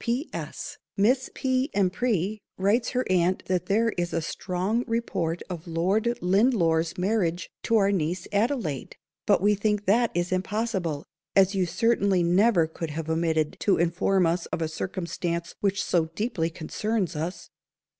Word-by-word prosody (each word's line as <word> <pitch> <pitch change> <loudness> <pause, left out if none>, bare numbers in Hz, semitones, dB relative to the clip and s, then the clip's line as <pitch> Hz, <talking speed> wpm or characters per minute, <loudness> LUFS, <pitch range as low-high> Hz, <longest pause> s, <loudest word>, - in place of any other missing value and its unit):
D." 240 +4 0
"P.S. - - -6 0.2
Miss 250 +6 +3
P. 260 +1 0
M'Pry 200 +1 +1 0.2
writes 205 +5 +2
her 255 0 -1
aunt 185 0 +1
that 180 -1 -1
there 225 +3 +3
is 175 0 -1
a 165 - +1
strong 190 +7 -1
_report 185 -8 -1
_of 175 -2 -7
Lord 195 +8 +1
Lindore's 180 -5 +2
marriage 180 -3 0
to 230 - +2
our 200 -1 +3
niece 175 -1 -1
Adelaide; 205 - -1 0.3
but - - +4
_we 210 0 +4
_think 210 0 0
that 230 +4 +3
is 175 +1 0
impossible, 185 -5 -1 0.3
as 195 0 +5
you 190 -2 +1
certainly 200 -3 +2
never 180 +1 +4
could 160 0 -6
have 160 +1 -4
omitted 160 -2 0
to 200 - +2
inform 175 +2 +2
us 165 +1 0
of - - -3
a - - 0
circumstance 170 0 -3
which 195 -1 0
so 170 -3 +2
deeply 205 -7 -1
concerns 185 +4 -2
_us. 170 +3 -5
185 Hz, 155 wpm, -26 LUFS, 170-215 Hz, 0.3 s, as